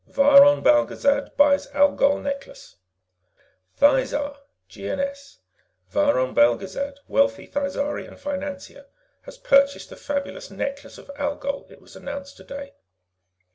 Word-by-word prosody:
VIRON 280 Hz, +1 st, +6 dB
BELGEZAD 285 Hz, -1 st, +2 dB
BUYS 285 Hz, 0 st, +4 dB
ALGOL 285 Hz, 0 st, +3 dB
NECKLACE 280 Hz, -, -7 dB, 1.0 s
Thizar 290 Hz, -, +2 dB, 0.3 s
(GNS) 280 Hz, 0 st, -5 dB, 0.5 s
Viron 130 Hz, +6 st, +1 dB
Belgezad, 190 Hz, -, +1 dB
wealthy 280 Hz, 0 st, +1 dB
Thizarian 285 Hz, +1 st, -4 dB
financier, 280 Hz, -1 st, -7 dB, 0.4 s
has -, -, -12 dB
purchased 280 Hz, -, +2 dB
the -, -, -9 dB
fabulous 290 Hz, -, -5 dB
Necklace 280 Hz, +1 st, -6 dB
of -, -, -12 dB
Algol, 285 Hz, -1 st, -3 dB
it -, -, -16 dB
was -, -, -17 dB
announced 280 Hz, 0 st, -8 dB
today. 280 Hz, 0 st, -10 dB
280 Hz, 100 wpm, -23 LUFS, 280-285 Hz, 1.0 s, VIRON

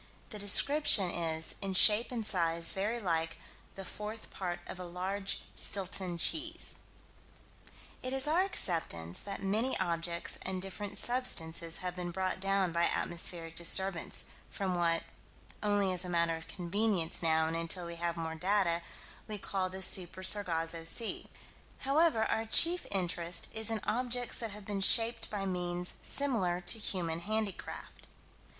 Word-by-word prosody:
The 210 Hz, -, -7 dB
description 205 Hz, -, +5 dB
is 160 Hz, -1 st, 0 dB
"in 195 Hz, -1 st, -2 dB
shape 215 Hz, +5 st, +7 dB
and 230 Hz, -3 st, -3 dB
size 170 Hz, -4 st, +2 dB
very 210 Hz, +5 st, -2 dB
like 165 Hz, -5 st, -2 dB, 0.4 s
the 195 Hz, -, -7 dB
fourth 210 Hz, +3 st, -7 dB
part 180 Hz, -2 st, -5 dB
of 185 Hz, -, -7 dB
a -, -, -5 dB
large 190 Hz, +3 st, -3 dB
Stilton 185 Hz, -2 st, -1 dB
cheese." 325 Hz, -, 0 dB, 1.3 s
It 255 Hz, -, -4 dB
is 270 Hz, 0 st, 0 dB
our 325 Hz, +4 st, +2 dB
acceptance 160 Hz, -, 0 dB
that 200 Hz, -1 st, -5 dB
many 220 Hz, +7 st, 0 dB
objects 170 Hz, -1 st, -1 dB
and 190 Hz, 0 st, -4 dB
different 195 Hz, +2 st, -2 dB
substances 170 Hz, -10 st, 0 dB
have 180 Hz, 0 st, -4 dB
been 180 Hz, -1 st, -5 dB
brought 185 Hz, +2 st, -2 dB
down 195 Hz, -1 st, 0 dB
by 170 Hz, 0 st, +2 dB
atmospheric 170 Hz, -1 st, -2 dB
disturbance 175 Hz, +1 st, -1 dB, 0.2 s
from 190 Hz, -2 st, -3 dB
what 170 Hz, -1 st, +1 dB, 0.6 s
only 205 Hz, -2 st, +1 dB
as 180 Hz, 0 st, +2 dB
a 180 Hz, -, -6 dB
matter 170 Hz, -1 st, 0 dB
of 165 Hz, 0 st, -10 dB
convenience 180 Hz, 0 st, -1 dB
now, 160 Hz, -1 st, +2 dB
and 160 Hz, +1 st, -3 dB
until 165 Hz, +2 st, 0 dB
we 170 Hz, 0 st, -7 dB
have 170 Hz, 0 st, -3 dB
more 160 Hz, -1 st, -4 dB
data 180 Hz, 0 st, 0 dB, 0.5 s
we 215 Hz, -1 st, -5 dB
call 190 Hz, -1 st, -3 dB
the 190 Hz, +1 st, +1 dB
Super 185 Hz, 0 st, +4 dB
Sargasso 165 Hz, -4 st, +1 dB
Sea; 220 Hz, +7 st, -1 dB, 0.5 s
however, 280 Hz, -3 st, +2 dB
our 220 Hz, 0 st, -2 dB
chief 340 Hz, +9 st, +4 dB
interest 175 Hz, -2 st, 0 dB
is 220 Hz, 0 st, -1 dB
in 225 Hz, -1 st, -2 dB
objects 245 Hz, +1 st, 0 dB
that 230 Hz, -, -3 dB
have 205 Hz, 0 st, -9 dB
been 200 Hz, -1 st, -4 dB
shaped 230 Hz, +4 st, +4 dB
by 200 Hz, -2 st, -4 dB
means 180 Hz, -1 st, -1 dB
similar 210 Hz, -11 st, 0 dB
to 175 Hz, +5 st, +2 dB
human 170 Hz, -5 st, -3 dB
handicraft. 215 Hz, +2 st, -5 dB
185 Hz, 150 wpm, -31 LUFS, 170-210 Hz, 1.3 s, shape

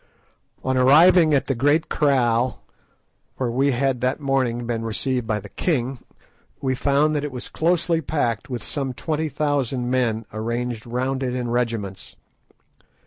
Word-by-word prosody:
On 130 Hz, 0 st, 0 dB
arriving 155 Hz, +5 st, +6 dB
at 135 Hz, -, +1 dB
the 135 Hz, -, 0 dB
great 145 Hz, +6 st, +2 dB
kraal, 125 Hz, -4 st, +1 dB, 0.7 s
where 125 Hz, -3 st, -2 dB
we 135 Hz, +4 st, +2 dB
had 130 Hz, -1 st, 0 dB
that 130 Hz, +3 st, 0 dB
morning 130 Hz, -4 st, 0 dB
been 115 Hz, -1 st, -2 dB
received 125 Hz, +2 st, -2 dB
by 110 Hz, -2 st, 0 dB
the 105 Hz, -, -10 dB
king, 130 Hz, -, -1 dB, 0.6 s
we 130 Hz, -1 st, 0 dB
found 145 Hz, +3 st, +2 dB
that 145 Hz, -, -1 dB
it 145 Hz, -, -3 dB
was 125 Hz, -1 st, -7 dB
closely 170 Hz, 0 st, +1 dB
packed 135 Hz, -5 st, -2 dB
with 120 Hz, -4 st, -4 dB
some 135 Hz, -3 st, -3 dB
twenty 155 Hz, +2 st, -2 dB
thousand 135 Hz, -4 st, -1 dB
men 115 Hz, -4 st, 0 dB
arranged 115 Hz, +1 st, -3 dB
round 130 Hz, +3 st, -2 dB
it 125 Hz, -1 st, -2 dB
in 120 Hz, -2 st, -2 dB
regiments. 115 Hz, -5 st, -3 dB
130 Hz, 150 wpm, -23 LUFS, 120-145 Hz, 0.7 s, arriving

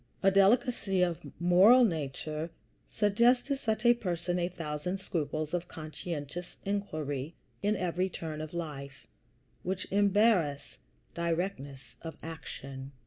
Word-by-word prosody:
A 195 Hz, -, +6 dB
delicacy 195 Hz, -1 st, +3 dB
of 175 Hz, -2 st, 0 dB, 0.2 s
moral 190 Hz, +9 st, +7 dB
nature 155 Hz, -2 st, -3 dB, 0.4 s
suggests 235 Hz, +4 st, +3 dB
to 280 Hz, -, -1 dB
such 220 Hz, -3 st, -2 dB
a 240 Hz, -, +8 dB
person 180 Hz, -5 st, -2 dB
a 175 Hz, 0 st, 0 dB
thousand 165 Hz, +1 st, -3 dB
scruples 155 Hz, -3 st, -2 dB
of 175 Hz, 0 st, -1 dB
conscientious 155 Hz, +1 st, -6 dB
inquiry 155 Hz, -7 st, -3 dB, 0.3 s
in 205 Hz, +1 st, +2 dB
every 180 Hz, 0 st, 0 dB
turn 155 Hz, -3 st, -5 dB
of 155 Hz, 0 st, -6 dB
life, 140 Hz, -5 st, -6 dB, 0.6 s
which 185 Hz, +1 st, -2 dB
embarrass 200 Hz, -, +3 dB, 0.4 s
directness 165 Hz, -7 st, -3 dB
of 165 Hz, -1 st, -7 dB
action. 135 Hz, -4 st, -7 dB
175 Hz, 120 wpm, -31 LUFS, 155-195 Hz, 0.6 s, a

